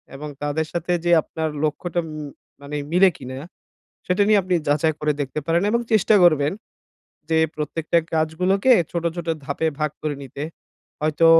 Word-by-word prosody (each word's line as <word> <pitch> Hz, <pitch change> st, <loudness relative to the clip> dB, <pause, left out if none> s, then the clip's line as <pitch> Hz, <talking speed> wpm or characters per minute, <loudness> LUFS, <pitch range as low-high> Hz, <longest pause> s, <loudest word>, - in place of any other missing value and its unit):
এবং 150 Hz, +2 st, -6 dB
তাদের 150 Hz, +2 st, -1 dB
সাথে 175 Hz, +1 st, -2 dB
যে 175 Hz, -, +3 dB
আপনার 160 Hz, +1 st, -3 dB
লক্ষ্যটা 175 Hz, +3 st, -1 dB
ম -, -, -8 dB, 0.5 s
মানে 140 Hz, +1 st, -6 dB, 0.2 s
মিলে 185 Hz, +2 st, +6 dB
কিনা 130 Hz, +1 st, -7 dB, 0.7 s
সেটা 185 Hz, +3 st, +2 dB
নিয়ে 210 Hz, -2 st, +5 dB
আপনি 185 Hz, 0 st, 0 dB
যাচাই 155 Hz, +2 st, +2 dB
করে 150 Hz, 0 st, +2 dB
দেখতে 145 Hz, +2 st, -2 dB
পারেন 170 Hz, +1 st, +2 dB
এবং 235 Hz, +2 st, +2 dB
চেষ্টা 215 Hz, 0 st, +4 dB
করবেন 150 Hz, -4 st, +4 dB, 0.8 s
যে 160 Hz, -, +3 dB, 0.2 s
প্রত্যেকটা 155 Hz, +2 st, 0 dB, 0.2 s
কাজগুলোকে 180 Hz, +9 st, +2 dB, 0.2 s
ছোট, 170 Hz, -1 st, -2 dB
ছোট 170 Hz, -1 st, -5 dB, 0.2 s
ধাপে 140 Hz, +4 st, -1 dB
ভাগ 150 Hz, 0 st, +1 dB
করে 150 Hz, -1 st, -1 dB
নিতে। 135 Hz, +2 st, -8 dB, 0.6 s
হয়তো, 155 Hz, +2 st, +3 dB
160 Hz, 160 wpm, -22 LUFS, 150-175 Hz, 0.8 s, মিলে